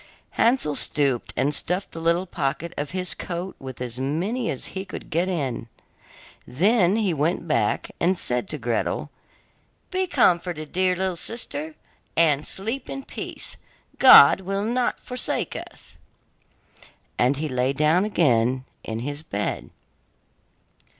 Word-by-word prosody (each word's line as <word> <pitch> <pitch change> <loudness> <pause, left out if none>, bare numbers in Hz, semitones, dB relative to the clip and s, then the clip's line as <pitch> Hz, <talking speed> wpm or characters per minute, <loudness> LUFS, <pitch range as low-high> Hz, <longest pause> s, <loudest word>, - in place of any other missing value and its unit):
Hansel 230 - +2
stooped 140 -6 0
and 140 +3 +1
stuffed 180 +6 -1
the 165 - -6
little 170 +3 +2
pocket 165 0 -3
of 145 0 -3
his 185 -1 -3
coat 180 +2 -5
with 130 -2 -8
as 125 0 -5
many 185 - -1
as 130 - -4
he 190 - -3
could 190 - -9
get 175 +4 +1
in. 135 -10 -2 0.8
Then 190 - +3
he 210 -5 +1
went 160 +3 -1
back 115 -9 0
and 180 +2 +2
said 125 -6 0
to 155 - -3
Gretel: 120 -3 -2 0.8
'Be 375 0 0
comforted, 175 - +1
dear 185 0 +2
little 190 0 -1
sister, 160 -6 -5 0.4
and 150 -3 +3
sleep 225 +7 -4
in 275 0 -5
peace, - - -6 0.4
God 190 - +9
will 195 +2 -2
not 240 +2 0
forsake 250 0 -3
us,' - - -9 1.2
and 130 +3 +3
he 155 +2 -2
lay 130 -1 0
down 155 +6 +3
again 130 - +2 0.2
in 110 0 -4
his 145 +3 -4
bed. 105 -10 -3
165 Hz, 135 wpm, -24 LUFS, 140-190 Hz, 1.2 s, God